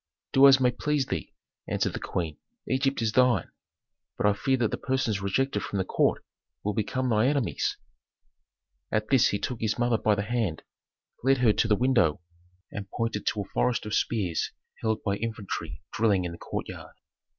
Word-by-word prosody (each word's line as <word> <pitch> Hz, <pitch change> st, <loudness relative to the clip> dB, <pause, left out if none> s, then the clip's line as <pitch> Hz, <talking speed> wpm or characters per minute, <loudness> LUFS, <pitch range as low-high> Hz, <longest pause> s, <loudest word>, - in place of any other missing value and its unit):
"Do 135 Hz, +1 st, +8 dB
as 135 Hz, -1 st, +7 dB
may 125 Hz, -1 st, +3 dB
please 145 Hz, +2 st, 0 dB
thee," -, -, -4 dB, 0.4 s
answered -, -, 0 dB
the -, -, -4 dB
queen. 80 Hz, -4 st, -3 dB, 0.3 s
"Egypt 135 Hz, -2 st, 0 dB
is 110 Hz, -, +1 dB
thine. 125 Hz, -6 st, +3 dB, 0.7 s
But -, -, 0 dB
I 105 Hz, -, +5 dB
fear 130 Hz, +6 st, +1 dB
that 115 Hz, -3 st, +1 dB
the -, -, -2 dB
persons 130 Hz, -7 st, -1 dB
rejected 105 Hz, +3 st, 0 dB
from 100 Hz, -, -4 dB
the 95 Hz, -, 0 dB
court -, -, +1 dB, 0.4 s
will 105 Hz, -, -1 dB
become 130 Hz, +4 st, -1 dB
thy 110 Hz, 0 st, +3 dB
enemies." 140 Hz, -4 st, 0 dB, 1.1 s
At 110 Hz, 0 st, 0 dB
this 130 Hz, -4 st, +5 dB
he 100 Hz, -, 0 dB
took 120 Hz, +3 st, -4 dB
his 110 Hz, -1 st, 0 dB
mother 120 Hz, -2 st, +2 dB
by 105 Hz, -, +3 dB
the 100 Hz, -, -1 dB
hand, 110 Hz, -7 st, -2 dB, 0.6 s
led 135 Hz, +1 st, +4 dB
her 120 Hz, -4 st, +4 dB
to 115 Hz, -, +1 dB
the 105 Hz, -, +4 dB
window, 120 Hz, -, +2 dB, 0.5 s
and 100 Hz, -1 st, -6 dB
pointed 115 Hz, -1 st, -3 dB
to 105 Hz, -, +1 dB
a 100 Hz, -, -8 dB
forest 125 Hz, -3 st, +1 dB
of 105 Hz, -, -4 dB
spears 95 Hz, -9 st, 0 dB, 0.3 s
held 110 Hz, -1 st, -1 dB
by 100 Hz, -1 st, 0 dB
infantry 100 Hz, -7 st, -5 dB
drilling 100 Hz, -5 st, +2 dB
in 85 Hz, -, -3 dB
the 85 Hz, -, -10 dB
courtyard. -, -, -6 dB
110 Hz, 185 wpm, -27 LUFS, 100-125 Hz, 1.1 s, Do